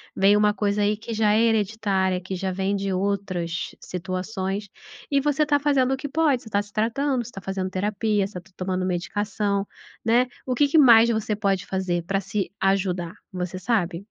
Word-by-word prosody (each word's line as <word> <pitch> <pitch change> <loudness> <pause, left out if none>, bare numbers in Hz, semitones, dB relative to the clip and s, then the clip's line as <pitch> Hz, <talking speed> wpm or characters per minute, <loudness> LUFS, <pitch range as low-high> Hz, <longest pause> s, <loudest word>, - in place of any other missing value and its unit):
Vem 195 +2 +5
uma 210 0 +3
coisa 205 0 0
aí 210 +1 +1
que 225 +2 -6
já 215 -1 +3
é 220 - +4
hereditária, 205 -4 +1
que 185 +1 -5
já 190 +1 -2
vem 190 +2 -1
de 195 0 -2
outras 185 -3 -2
situações 190 +2 -4 0.4
e 280 - +4
você 295 +1 +2
tá 290 -1 +2
fazendo 270 -3 +2
o - - -1
que 280 +1 -5
pode, 295 -4 +2
você 220 - -11
tá 200 0 +1
se 205 0 -14
tratando, 245 +4 0
você 245 - -10
tá 195 - -8
fazendo 190 0 -3
terapia, 205 +2 0
você 185 -3 -8
tá 190 +2 -23
tomando 185 0 -2
medicação, 200 +2 -1 0.4
né? 240 +2 +4 0.2
O 255 -1 -1
que 290 +3 +4
que 315 - +2
mais 235 -4 +7
você 220 -1 0
pode 200 -2 0
fazer 185 -3 -1
pra 195 +3 0
se 195 -1 -3
ajudar, 185 -3 0 0.2
você 185 0 -4
sabe? 185 -7 0
200 Hz, 195 wpm, -24 LUFS, 190-225 Hz, 0.4 s, mais